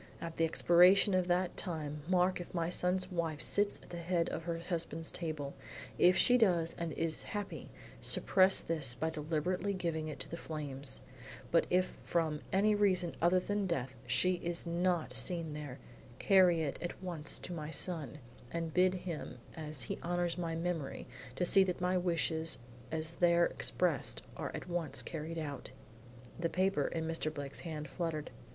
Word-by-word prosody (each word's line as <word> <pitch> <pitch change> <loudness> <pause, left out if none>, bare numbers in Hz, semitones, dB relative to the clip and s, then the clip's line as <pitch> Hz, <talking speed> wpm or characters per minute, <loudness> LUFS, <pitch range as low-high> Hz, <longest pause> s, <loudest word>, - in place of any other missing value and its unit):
At 165 -1 -6
the 165 - +4
expiration 180 +5 +6
of 185 -1 +2
that 180 0 +1
time 150 -5 -4
mark 180 0 +3
if 175 - -9
my 170 0 0
son's 185 +1 0
wife 165 -4 -1
sits 205 +5 +2
at - - -15
the 175 - -5
head 170 0 0
of 165 - -4
her 170 -1 -1
husband's 165 -1 -4
table; 155 -5 -4 0.5
if 180 +1 +6
she 250 +4 +5
does 175 -7 +3
and 170 -1 -2
is 165 -1 -1
happy, 205 -2 -5 0.3
suppress 190 0 +4
this 150 -7 -1
by 160 +5 -1
deliberately 165 +5 -1
giving 165 -4 -2
it 155 - -6
to - - -6
the 170 - -6
flames, 140 -5 -5 0.5
but 165 - +4
if 180 +1 +1
from 160 -3 0
any 205 +3 +4
reason 185 -4 +2
other 175 +2 +5
than 205 +1 -1
death, 135 -7 -2
she 180 +9 +2
is 170 0 -3
not 170 -4 0
seen 160 +4 -1
there, 145 -4 -6 0.4
carry 180 -2 +5
it 140 - -3
at 175 +2 -5
once 170 -5 -4
to 180 - -6
my 155 -2 -5
son, 160 -3 -2 0.3
and 165 0 -3
bid 185 +1 +4
him 165 -7 -5 0.2
as 155 -5 -3
he - - -4
honors 175 0 0
my 170 -2 -2
memory, 165 -4 -3 0.3
to 180 - +1
see 195 +2 +7
that 180 -2 -2
my 180 +1 +1
wishes 165 -2 0 0.3
as 160 +1 -3
there 170 -1 +5
expressed 150 - -1
are - - -3
at - - -6
once 175 -3 -2
carried 165 0 -5
out.'" 145 -4 -5 0.7
The 165 0 0
paper 185 -6 +1
in 165 -1 -2
Mr. 165 -1 -1
Blake's 140 -2 -6
hand 155 -3 -5
fluttered. 160 -1 -3
170 Hz, 170 wpm, -34 LUFS, 155-180 Hz, 0.7 s, see